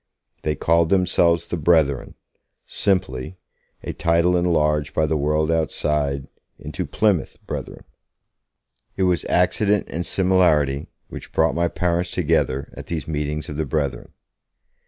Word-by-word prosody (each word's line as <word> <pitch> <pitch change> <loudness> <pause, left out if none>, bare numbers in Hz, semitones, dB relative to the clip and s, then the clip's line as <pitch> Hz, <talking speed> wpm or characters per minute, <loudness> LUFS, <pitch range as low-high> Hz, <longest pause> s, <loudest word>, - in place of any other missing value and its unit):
They 75 -1 -1
called 85 +2 +2
themselves 85 -3 +2
'the 85 - -4
Brethren', 75 -4 +2 0.5
simply; 85 -5 -1 0.5
a - - -4
title 85 +1 +2
enlarged 75 -4 +1
by 80 - +3
the 80 +1 0
world 75 +2 +1
outside 75 -3 -1 0.3
into - - -5
'Plymouth 105 -6 0
Brethren'. - - -6 1.1
It 95 - +1
was 90 -2 +1
accident 100 +3 +2
and 85 - -2
similarity 85 -8 +2 0.2
which - - -9
brought 80 0 +2
my 85 0 +1
parents 85 +1 -1
together 80 -6 0
at - - -9
these 80 -4 -4
meetings 75 0 -3
of 75 - -6
the 80 - -1
Brethren. 70 -3 -2
80 Hz, 130 wpm, -22 LUFS, 75-90 Hz, 1.1 s, by